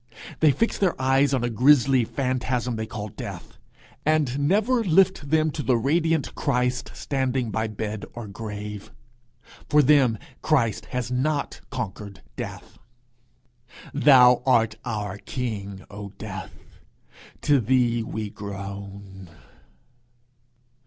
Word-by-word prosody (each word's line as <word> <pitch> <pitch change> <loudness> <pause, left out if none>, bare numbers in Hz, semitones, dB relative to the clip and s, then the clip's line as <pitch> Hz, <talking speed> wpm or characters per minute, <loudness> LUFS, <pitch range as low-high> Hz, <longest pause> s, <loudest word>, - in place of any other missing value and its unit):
They 155 - +5
fix 230 - 0
their 185 -8 +1
eyes 135 +2 +3
on 130 -3 0
a 120 - 0
grisly 130 +1 +4
phantasm 125 -1 -1
they 110 0 -4
call 105 -2 -6
Death, - - -9 0.4
and 150 -4 +1
never 220 - +2
lift 190 -4 +3
them 155 0 +2
to 150 - -4
the 130 -4 +2
radiant 160 +4 +1
Christ 125 -3 0
standing 130 -4 -1
by 110 +2 -1
bed 110 -1 -5
or 115 -2 -6
grave! 105 0 -7 0.8
For 150 0 +5
them 130 -5 +4 0.2
Christ 125 -9 +1
has 125 -1 -3
not 140 +3 -1
conquered 100 -5 -6
Death: - - -8 1.1
Thou 125 -4 +6
art 115 -4 +3
our 105 -4 -4
king, 100 -7 -5
O 100 0 -7
Death! 95 -3 -9 0.6
to 145 -2 +4
thee 120 0 +2
we 110 -2 -5
groan! 100 -2 -8
125 Hz, 120 wpm, -25 LUFS, 105-140 Hz, 1.1 s, Thou